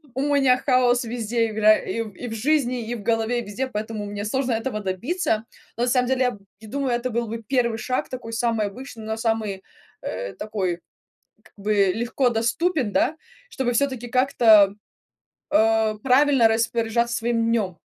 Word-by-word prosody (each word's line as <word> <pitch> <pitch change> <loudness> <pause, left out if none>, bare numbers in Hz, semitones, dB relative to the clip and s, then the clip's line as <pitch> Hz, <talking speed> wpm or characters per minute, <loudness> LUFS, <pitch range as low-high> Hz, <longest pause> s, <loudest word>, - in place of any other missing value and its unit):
у 265 - -1
меня 275 -3 +3
хаос 255 -1 +2
везде 230 0 -1
игра: 215 0 +5
и 230 - -4
и 205 +5 -8
в 225 - -5
жизни, 250 -1 0
и 240 - -2
в 210 - -8
голове, 225 +2 0
и 240 - -4
везде, 210 +6 -3
поэтому 215 -2 -4
мне 205 0 -5
сложно 260 +3 -1
этого 225 0 -2
добиться. 220 - -1 0.3
Но 235 - 0
на 250 - +1
самом 250 0 +2
деле, 265 0 0
я 250 - +2
д 200 - -12 0.3
думаю, 275 +3 -2
это 245 +1 -3
был 235 +1 -1
бы 230 +1 -6
первый 235 -1 0
шаг 255 +3 -2
такой 245 -3 -7
самый 230 -2 0
обычный, 230 +1 -9
но 220 - -2
самый, 220 -4 -2 0.4
э, 95 +1 -5
такой 190 -5 -3 0.6
как - - -23
бы 210 +1 -2 0.2
легко 240 +3 0
доступен, 245 - 0
да, 305 +9 +1 0.3
чтобы 265 - -2
всё-таки 250 -1 -1
как-то, 230 -6 +5 0.8
а, 220 -5 +3
правильно 265 -2 +4
распоряжаться 230 +1 0
своим 230 0 0
днм. 195 -7 -1
230 Hz, 170 wpm, -23 LUFS, 215-255 Hz, 0.8 s, игра